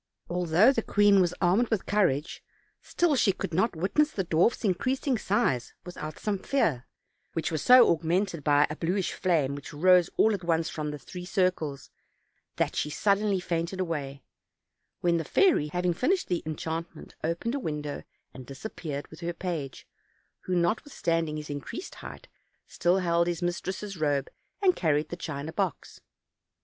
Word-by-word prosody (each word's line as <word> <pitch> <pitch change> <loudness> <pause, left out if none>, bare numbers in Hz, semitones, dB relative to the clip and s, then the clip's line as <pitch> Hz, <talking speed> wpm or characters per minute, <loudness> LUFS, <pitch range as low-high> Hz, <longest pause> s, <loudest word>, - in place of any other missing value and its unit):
Although 180 +6 +4
the 230 - 0
queen 205 -2 +4
was 180 -1 +1
armed 195 +8 +3
with 220 -4 -1
courage, 165 -8 0 0.4
still 340 -4 +1
she 220 -6 +3
could 170 - -5
not 190 +4 +1
witness 195 - +2
the 190 -9 -3
dwarf's 170 +10 +2
increasing 255 +8 0
size 160 - 0
without 155 -3 -7
some 205 -2 -2
fear; 165 - 0 0.5
which 165 - -2
was 155 -3 -2
so 250 -1 +8
augmented 170 0 -1
by 145 0 +4
a - - -4
bluish 180 +4 -1
flame 155 -7 +1
which 140 -1 -8
rose 180 +3 +5
all 220 - +4
at 195 -3 -4
once 165 -1 +1
from 150 -1 -4
the 150 - -5
three 180 +6 -9
circles, 180 -7 -1 0.6
that - - -1
she 150 - -1
suddenly 200 +3 +1
fainted 170 +1 -3
away; 145 -6 -3 0.8
when 170 -1 +2
the 165 - -1
fairy, 305 - +3
having 180 +3 0
finished 325 - 0
the 175 -2 0
enchantment, 160 +1 -5
opened 170 +9 -1
a 280 - -1
window 150 - -4 0.3
and 130 -1 -11
disappeared 145 -1 -6
with 160 - -12
her 175 0 -3
page, 165 -7 -5 0.6
who, 185 - -1
notwithstanding 170 - 0
his 150 -1 -6
increased 145 - -6
height, - - -10 0.4
still 175 +2 +1
held 170 -2 +2
his 175 0 -2
mis 175 0 -1
tress' 195 +1 -5
robe 145 -4 0 0.3
and 370 -2 +5
carried 155 -2 +1
the - - -4
china 155 -2 -5
box. - - -3
175 Hz, 160 wpm, -28 LUFS, 155-195 Hz, 0.8 s, so